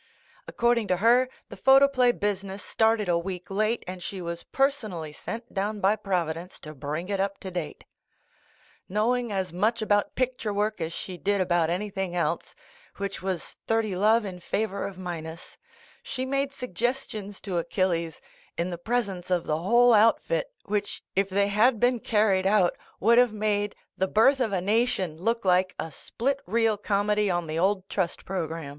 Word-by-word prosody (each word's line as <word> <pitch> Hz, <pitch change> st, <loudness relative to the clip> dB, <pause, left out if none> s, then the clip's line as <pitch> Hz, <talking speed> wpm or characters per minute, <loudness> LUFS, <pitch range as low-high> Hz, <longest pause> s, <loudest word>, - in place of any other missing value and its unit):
According 235 Hz, -2 st, +1 dB
to 185 Hz, -, +1 dB
her, 240 Hz, +5 st, +4 dB, 0.2 s
the -, -, -8 dB
photoplay 270 Hz, -2 st, +5 dB
business 200 Hz, -2 st, -3 dB
started 220 Hz, -2 st, +2 dB
a 170 Hz, -1 st, +2 dB
week 180 Hz, +1 st, -6 dB
late 215 Hz, +4 st, 0 dB
and 185 Hz, 0 st, -7 dB
she 190 Hz, +2 st, -5 dB
was 170 Hz, -1 st, -5 dB
personally 215 Hz, -, -1 dB
sent 230 Hz, +9 st, -7 dB
down 205 Hz, +2 st, -1 dB
by 200 Hz, +2 st, +3 dB
Providence 180 Hz, -4 st, -3 dB
to 155 Hz, -1 st, -9 dB
bring 150 Hz, +5 st, -4 dB
it 200 Hz, -1 st, -2 dB
up 195 Hz, 0 st, -1 dB
to 190 Hz, -, -6 dB
date. 175 Hz, -4 st, -5 dB, 1.1 s
Knowing 235 Hz, +4 st, +1 dB
as 190 Hz, -3 st, -2 dB
much 215 Hz, +6 st, +1 dB
about 205 Hz, -2 st, +1 dB
picture 255 Hz, -4 st, -1 dB
work 210 Hz, -1 st, -1 dB
as 160 Hz, 0 st, -2 dB
she 180 Hz, +2 st, -6 dB
did 200 Hz, 0 st, +1 dB
about 175 Hz, -3 st, +2 dB
anything 190 Hz, 0 st, -2 dB
else, 175 Hz, -, -1 dB, 0.4 s
which 200 Hz, 0 st, -4 dB
was 185 Hz, -3 st, -4 dB
thirty 225 Hz, -3 st, +1 dB
love 215 Hz, +4 st, +3 dB
in 185 Hz, -2 st, -6 dB
favor 200 Hz, +2 st, -2 dB
of 195 Hz, -, -9 dB
minus, 165 Hz, -3 st, -7 dB, 0.5 s
she 260 Hz, -1 st, -4 dB
made 275 Hz, +1 st, 0 dB
sug 250 Hz, -7 st, -8 dB
gestions 215 Hz, -3 st, -2 dB
to 185 Hz, -4 st, -2 dB
Achilles, 170 Hz, -1 st, -1 dB, 0.4 s
in 175 Hz, +2 st, -1 dB
the 175 Hz, -, -5 dB
presence 200 Hz, -4 st, -2 dB
of 180 Hz, -2 st, +1 dB
the 155 Hz, +1 st, 0 dB
whole 235 Hz, +7 st, +5 dB
outfit, 230 Hz, -, +3 dB
which, 205 Hz, 0 st, -3 dB
if 195 Hz, 0 st, +2 dB
they 200 Hz, +1 st, +2 dB
had 220 Hz, +3 st, +3 dB
been 245 Hz, +1 st, +3 dB
car 215 Hz, -1 st, +2 dB
ried 190 Hz, -1 st, +2 dB
out, 195 Hz, -3 st, +3 dB, 0.2 s
would 235 Hz, +4 st, +5 dB
have 245 Hz, -3 st, +4 dB
made 205 Hz, -1 st, 0 dB, 0.2 s
"The 190 Hz, -, +2 dB
Birth 245 Hz, +8 st, +4 dB
of 235 Hz, -5 st, +1 dB
a 190 Hz, -2 st, 0 dB
Nation" 200 Hz, -5 st, 0 dB
look 230 Hz, +3 st, -1 dB
like 185 Hz, 0 st, +3 dB
a 160 Hz, -, -4 dB
split 275 Hz, -, -2 dB
reel 225 Hz, -1 st, +2 dB
comedy 205 Hz, 0 st, +1 dB
on 175 Hz, -1 st, 0 dB
the 160 Hz, +1 st, -3 dB
old 190 Hz, +1 st, +1 dB
trust 185 Hz, -4 st, -2 dB
program. 165 Hz, -5 st, -3 dB
200 Hz, 175 wpm, -27 LUFS, 180-225 Hz, 1.1 s, photoplay